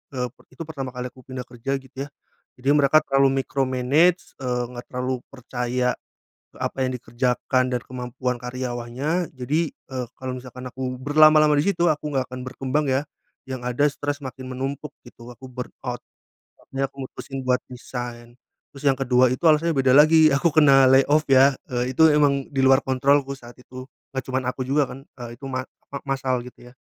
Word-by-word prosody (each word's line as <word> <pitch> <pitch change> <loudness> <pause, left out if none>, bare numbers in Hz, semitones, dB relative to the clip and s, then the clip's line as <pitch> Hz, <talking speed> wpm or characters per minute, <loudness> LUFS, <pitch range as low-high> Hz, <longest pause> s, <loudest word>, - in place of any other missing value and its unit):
eee, 125 -1 -1 0.2
itu 130 +5 -7
pertama 135 -5 -5
kali 125 0 -5
aku 130 - -17
pindah 130 -1 -6
kerja, 125 +3 -3
gitu, 135 +1 -8
ya. - - -22 0.5
Jadi 130 +2 -1
mereka 145 +1 +5
terlalu 135 0 +3
micromanage, 135 +7 +1
eee, 125 -1 -1
nggak 120 0 -8
terlalu 125 0 -2
percaya 125 -1 -2 0.6
apa 135 - -2
yang 130 - 0
dikerjakan 125 +2 0
dan 125 - 0
kemampuan 125 0 -4
karyawannya 125 +6 -3
jadi, 145 +6 -1
eee, 130 -2 -7
kalau 130 -1 -4
misalkan 125 0 -10
aku 130 0 -5
berlama-lama 155 +2 +5
di 145 - +2
situ, 175 -2 +1
aku 150 -2 0
nggak 130 -1 0
akan 130 0 -6
berkembang, 135 +3 -1
ya, 130 +2 +2 0.5
yang 130 -2 -5
ada 125 +4 +2
stres 145 0 -3
makin 130 0 -7
menumpuk, 135 +3 -4 0.2
gitu, 120 0 -13
aku 120 +2 -12
burnout. 125 0 -6 0.6
Makanya 135 0 -3
aku 135 -1 -7
mutusin 135 +1 -7
buat 125 0 +2
resign. 120 -1 -7 0.4
Terus 140 - -11
yang 135 -1 +4
ke-2 125 -1 +3
itu 130 - -2
alasannya 160 +2 +4
beda 130 -1 +4
lagi, 155 +2 +7
aku 155 +4 +2
kena 140 -3 +7
lay 135 +1 +6
off, 150 +1 +3
ya, 135 +1 +6 0.2
eee, 125 +1 -1
itu 160 +3 +7
emang 140 -2 +2
di 140 - -2
luar 135 +1 +6
kontrolku 135 +1 +2
saat 120 -2 -14
itu. 130 +1 -10 0.2
Nggak 130 -1 -3
cuman 130 0 -1
aku 130 - -7
juga, 145 +2 +3
kan, 135 +1 -10 0.2
eee, 120 0 -9
itu 140 - -9
ma 130 -1 -3
apa, 140 - -11
massal, 135 -2 0
gitu, 125 0 -13
ya. - - -22
130 Hz, 180 wpm, -23 LUFS, 125-140 Hz, 0.6 s, lagi